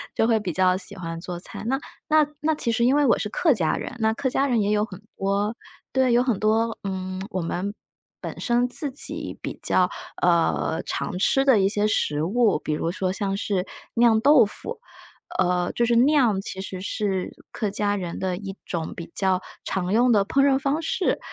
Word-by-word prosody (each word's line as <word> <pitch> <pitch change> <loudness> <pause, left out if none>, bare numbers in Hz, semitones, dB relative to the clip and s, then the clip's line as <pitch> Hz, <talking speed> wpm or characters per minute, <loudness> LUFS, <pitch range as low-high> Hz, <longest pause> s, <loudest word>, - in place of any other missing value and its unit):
就 225 - +2
会 225 -2 +3
比 185 -5 -4
较 185 +1 +3
喜 200 +1 -3
欢 165 -3 -6
做 175 0 -6
菜。 - - -8
那 265 +3 0 0.3
那 310 -1 +4
那 315 +1 +2
其 240 -6 -1
实 235 +1 +2
因 265 +3 +4
为 295 - +3
我 - - +4
是 - - -2
客 300 +5 +2
家 160 -7 +3
人， 250 - -6
那 220 0 +2
客 260 +3 -1
家 275 +2 +1
人 240 -5 +2
也 205 - 0
有 210 0 +2
很 190 -2 -11 0.2
多 200 +3 0 0.4
对， 260 -2 +3
有 240 - +5
很 245 -6 0
多， 225 +1 +1
嗯， 185 -1 -4
我 185 - -2
们 180 +4 -3 0.5
本 - - -6
身 240 0 +1
自 285 +2 -1
己 265 - -2
比 - - -6
较 180 -1 +3 0.3
呃， 170 -1 +1
常 195 - -3
吃 270 +8 +3
的 260 -7 +5
一 190 - +3
些 205 +1 +1
食 150 -8 0
物， 205 0 +2
比 - - -3
如 165 +2 -1
说 185 +1 -1
像 195 0 -2
是 195 -2 -1 0.3
酿 230 -2 +4
豆 275 -4 +6
腐。 440 - -3 0.6
呃， 180 -1 +1
就 240 - 0
是 235 0 +2
“酿” 265 -9 +3
其 190 -1 -5
实 190 -1 -6
是 195 -1 -2 0.2
客 215 - -2
家 205 0 +1
人 180 -4 -5
的 185 -1 -2
一 195 -1 -7
种 165 -3 -3
比 170 0 -9
较 190 -1 +1 0.2
常 185 -1 -2
用 240 +3 +4
的 205 -3 +4
烹 275 +4 +3
饪 270 -1 +3
方 285 +2 0
式， 340 +3 0
205 Hz, 220 characters per minute, -24 LUFS, 185-245 Hz, 0.6 s, 豆